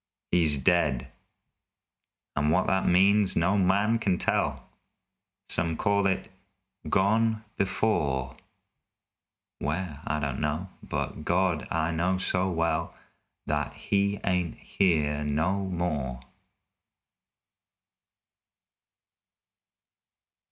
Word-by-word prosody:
He's 80 Hz, -4 st, +3 dB
dead 70 Hz, -5 st, +1 dB, 1.3 s
and 75 Hz, +2 st, +1 dB
what 90 Hz, +4 st, +3 dB
that 95 Hz, 0 st, +1 dB
means 100 Hz, +3 st, +4 dB
no 90 Hz, +5 st, +2 dB
man 100 Hz, +4 st, +2 dB
kin 95 Hz, -5 st, +1 dB
tell. -, -, -1 dB, 0.8 s
Some 80 Hz, -1 st, +1 dB
call 100 Hz, -1 st, +2 dB
it 95 Hz, -, -1 dB, 0.6 s
"gone 110 Hz, +3 st, +2 dB
before." 70 Hz, -10 st, 0 dB, 1.2 s
Where? 75 Hz, -1 st, -3 dB
I 75 Hz, +1 st, 0 dB
don't 70 Hz, -3 st, -2 dB
know, 75 Hz, +5 st, -2 dB
but 75 Hz, -, -4 dB
God! 90 Hz, -1 st, +1 dB
I 80 Hz, 0 st, 0 dB
know 90 Hz, +3 st, 0 dB
so 95 Hz, 0 st, 0 dB
well 85 Hz, -2 st, -1 dB, 0.5 s
That 75 Hz, -1 st, -1 dB
he 100 Hz, 0 st, 0 dB
ain't 90 Hz, -3 st, 0 dB
here 75 Hz, -6 st, 0 dB
no 80 Hz, +7 st, 0 dB
more! 75 Hz, -8 st, -2 dB
90 Hz, 90 wpm, -27 LUFS, 75-95 Hz, 1.3 s, means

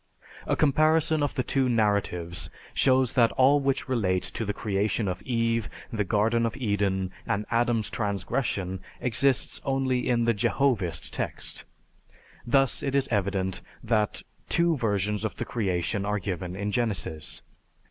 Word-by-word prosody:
A -, -, +2 dB
comparison 155 Hz, +2 st, +3 dB
of 145 Hz, -, -1 dB
the 130 Hz, -, 0 dB
two 130 Hz, +1 st, +1 dB
narratives 100 Hz, -7 st, 0 dB, 0.2 s
shows 130 Hz, -2 st, +3 dB
that 115 Hz, -2 st, +4 dB
all 135 Hz, +3 st, +5 dB
which 135 Hz, -1 st, 0 dB
relates 95 Hz, -8 st, 0 dB
to 115 Hz, -, -3 dB
the 105 Hz, -, 0 dB
creation 105 Hz, +1 st, -1 dB
of 90 Hz, -1 st, -3 dB
Eve, 115 Hz, -3 st, 0 dB, 0.2 s
the 105 Hz, -2 st, +1 dB
Garden 110 Hz, +4 st, +2 dB
of 115 Hz, -, -5 dB
Eden, 100 Hz, -6 st, 0 dB, 0.2 s
and 105 Hz, +1 st, 0 dB
Adam's 115 Hz, -2 st, +2 dB
transgression, 100 Hz, -3 st, -2 dB, 0.2 s
exists 130 Hz, +2 st, +1 dB
only 135 Hz, -2 st, 0 dB
in 120 Hz, -1 st, +2 dB
the 115 Hz, -, +3 dB
Jehovist 105 Hz, -, 0 dB
text. -, -, -4 dB, 0.8 s
Thus 135 Hz, +1 st, +3 dB
it 140 Hz, -1 st, -1 dB
is 140 Hz, -, +2 dB
evident 95 Hz, -3 st, -1 dB, 0.2 s
that 110 Hz, -3 st, 0 dB, 0.3 s
two 170 Hz, -1 st, +3 dB
versions 105 Hz, -4 st, 0 dB
of 110 Hz, -, -2 dB
the -, -, -4 dB
Creation 100 Hz, -2 st, -1 dB
are 105 Hz, +1 st, 0 dB
given 90 Hz, -2 st, -4 dB
in 100 Hz, +2 st, -2 dB
Genesis. 100 Hz, -9 st, -2 dB
110 Hz, 145 wpm, -27 LUFS, 100-130 Hz, 0.8 s, all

